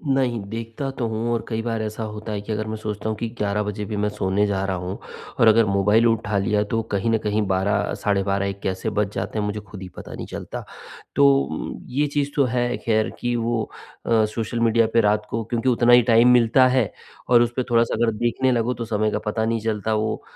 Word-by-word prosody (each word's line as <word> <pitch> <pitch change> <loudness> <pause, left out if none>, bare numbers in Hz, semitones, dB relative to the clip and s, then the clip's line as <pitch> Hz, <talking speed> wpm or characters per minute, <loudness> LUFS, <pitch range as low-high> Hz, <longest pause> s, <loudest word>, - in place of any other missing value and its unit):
नहीं, 125 -4 +1
देखता 115 +4 -5
तो 120 -3 -3
हूँ 115 +1 -2
और 115 - -1
कई 115 -1 -2
बार 115 -1 -2
ऐसा 110 +1 -4
होता 105 0 -6
है 100 -1 -3
कि 105 - -7
अगर 110 0 -2
मैं 110 - -3
सोचता 105 0 -4
हूँ 110 - -1
कि 115 - -3
11 105 0 0
बजे 105 0 -4
भी 105 -1 -4
मैं 105 0 0
सोने 105 0 0
जा 95 -1 -1
रहा 95 -1 -1
हूँ 90 +2 -5 0.4
और 115 - +6
अगर 115 +1 +6
मोबाइल 105 +3 +3
उठा 110 -3 0
लिया 105 +1 +1
तो 115 0 +1
कहीं 100 +3 0
न 110 - +3
कहीं 105 +1 +1
12 95 +2 0
साढ़े 100 -1 +1
12 100 0 0
1 100 - -6
कैसे 95 +3 -2
बज 105 -1 -1
जाते 110 - -3
हैं 105 - -1
मुझे 105 +1 -3
खुद 100 -2 -11
ही 95 - -7
पता - - -8
नहीं - - -6
चलता। - - -6 0.5
तो 140 - +2
ये 145 +4 +1
चीज़ 145 -1 0
तो 140 - +3
है 120 0 0
ख़ैर 110 -1 +2
कि 120 0 -1
वो 115 -1 0 0.4
अ, 110 -2 +3
सोशल 110 +2 -3
मीडिया 115 -1 +3
पे 115 - +5
रात 105 0 +1
को 115 -1 -2
क्योंकि 120 +3 -1
उतना 120 0 +4
ही 125 - +8
टाइम 115 +1 +5
मिलता 125 +2 +5
है 125 -5 +1 0.4
और 120 -1 +6
उसपे 120 +2 0
थोड़ा-सा 115 0 +3
अगर 115 0 +2
देखने 120 +3 +1
लगो 120 +1 +1
तो 115 - -5
समय 110 -1 0
का - - -1
पता 110 +1 -1
नहीं 115 0 0
चलता 110 -1 -1
वो 110 0 -1
110 Hz, 235 wpm, -23 LUFS, 105-120 Hz, 0.5 s, ही